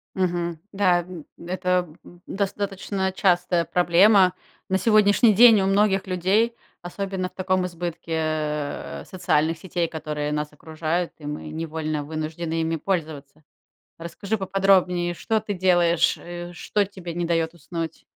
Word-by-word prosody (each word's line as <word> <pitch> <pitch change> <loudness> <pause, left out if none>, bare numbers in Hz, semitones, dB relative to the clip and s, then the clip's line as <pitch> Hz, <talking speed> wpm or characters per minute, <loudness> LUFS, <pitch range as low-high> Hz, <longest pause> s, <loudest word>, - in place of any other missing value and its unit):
Мгм. 175 -3 -1
Да, 185 -3 +3
м, 175 -3 -10
это, 180 0 -1 0.2
м, 175 0 -16
достаточно 195 -1 -2
частая 180 -2 +2
проблема 180 +2 +5 0.4
на 190 - +2
сегодняшний 215 +1 +4
день 225 -1 +7
у - - +1
многих 195 0 +2
людей, 195 +6 +1 0.3
особенно 185 0 -4
в - - -34
таком 185 -1 0
избытке, 170 -1 -6
э, 155 -2 -3
социальных 165 -4 0
сетей, 175 0 -2
которые 150 -2 -4
нас 150 0 -2
окружают, 160 +3 -3
и 150 - -12
мы 150 +1 -5
невольно 155 -1 -3
вынуждены 160 +2 -3
ими 160 0 -1
пользоваться. 155 -4 -4 0.6
Расскажи 170 +6 -4
поподробнее, 185 -3 +2
что 220 +5 -1
ты 210 -1 -4
делаешь, 175 -2 +3
э, 175 0 -8
что 205 +3 -1
тебе 185 -3 -8
не 175 0 -2
дает 165 -1 0
уснуть? 165 0 -6
175 Hz, 135 wpm, -24 LUFS, 160-190 Hz, 0.6 s, день